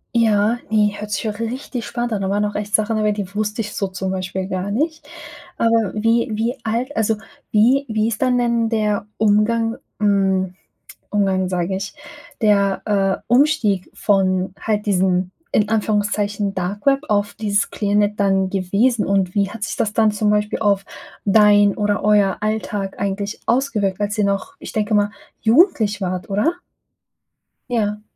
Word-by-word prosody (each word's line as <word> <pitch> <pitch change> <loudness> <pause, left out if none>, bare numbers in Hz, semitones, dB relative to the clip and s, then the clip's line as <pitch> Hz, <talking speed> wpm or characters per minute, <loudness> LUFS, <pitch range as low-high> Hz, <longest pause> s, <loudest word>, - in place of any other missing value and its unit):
Ja, 220 0 +3
ne, 210 -1 +2
hört 210 0 -6
sich 210 +2 -1
auch 205 0 -6
richtig 240 +1 -4
spannend 240 -1 -3
an. 210 -3 -1
Da 190 - -1
waren 205 +1 +1
noch 210 0 -2
echt 210 0 -1
Sachen 215 +1 +1
dabei, 210 -1 +1
die 200 -2 -5
wusste 210 +1 -2
ich 210 -1 -6
so 195 - -1
zum 185 0 -4
Beispiel 185 0 -3
gar 185 +1 -3
nicht. 310 +9 -2 0.5
Aber 230 -3 +2
wie 230 +3 +2
wie 230 +4 -1
alt 235 +5 -1
also, 220 0 +2 0.4
wie 250 +6 +4
wie 220 -1 0
ist 220 - -4
dann 255 -1 +3
denn 235 -1 +1
der 210 -3 0
Umgang 225 +2 +2 0.2
hm, 195 -3 +1 0.6
Umgang, 190 -2 +1
sage 180 +1 -1
ich, 200 +2 -5 0.5
der, 200 -3 +2
äh, 195 -2 +1
Umstieg 240 - +2
von 190 -2 +1
halt 210 -1 -1
diesem, 185 -2 +1 0.2
in 210 -1 +2
Anführungszeichen 205 -1 0
Darkweb 205 +11 0
auf 205 -1 0
dieses 210 +1 0
Clearnet 205 0 0
dann 195 -1 +2
gewesen? 200 +5 +1
Und 195 -2 +1
wie 200 -1 +2
hat 225 0 -9
sich - - -3
das 210 - 0
dann 220 0 +3
zum 210 0 0
Beispiel 210 0 0
auf 200 -2 +1 0.4
dein 205 -1 +5
oder 205 0 0
euer 205 -2 +3
Alltag 210 -2 -3
eigentlich 200 +1 -3
ausgewirkt, 225 -7 0
als 205 +1 -2
ihr 210 - +3
noch, 200 +7 -2
ich - - -9
denke 215 0 0
mal, 205 0 +3 0.3
jugendlich 225 - +3
wart, 185 -1 -3
oder? 210 - +2 1.2
Ja. 210 -3 -1
210 Hz, 165 wpm, -20 LUFS, 200-225 Hz, 1.2 s, dein